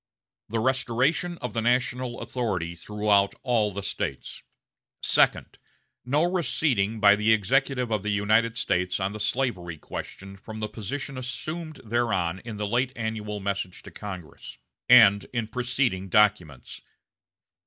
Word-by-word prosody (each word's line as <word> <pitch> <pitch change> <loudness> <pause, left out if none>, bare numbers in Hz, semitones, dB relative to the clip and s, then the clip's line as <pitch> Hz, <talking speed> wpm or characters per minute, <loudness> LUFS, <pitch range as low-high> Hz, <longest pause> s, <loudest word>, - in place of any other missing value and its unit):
The 115 - -2
restoration 130 +7 +1
of 125 - -3
the 115 - -1
national 125 +1 0
authority 95 -9 -2
throughout 105 +1 +1
all 115 -5 +1
the 100 +1 -5
States. - - -4 0.6
Second. - - +2 0.4
No 145 +5 +1
receding 145 - 0
by 100 -1 +7
the 105 +2 +2
Executive 125 +3 +1
of 105 -2 +1
the 105 - -3
United 110 +3 +2
States 90 -5 0
on 95 +1 -1
the 105 - -7
slavery 105 -7 -2
question 100 +5 -8
from 110 +2 -9
the 110 0 -3
position 135 +6 -5
assumed 155 +5 -5
thereon 100 -7 0
in 115 -3 -7
the 105 - -2
late 125 +5 0
annual 110 -2 -4
message 100 -2 -4
to - - -11
Congress, 95 -6 -9 0.3
and 105 -5 +7
in 115 -3 -1
preceding 125 -5 -1
documents. 90 -10 +1
110 Hz, 135 wpm, -26 LUFS, 100-125 Hz, 0.6 s, by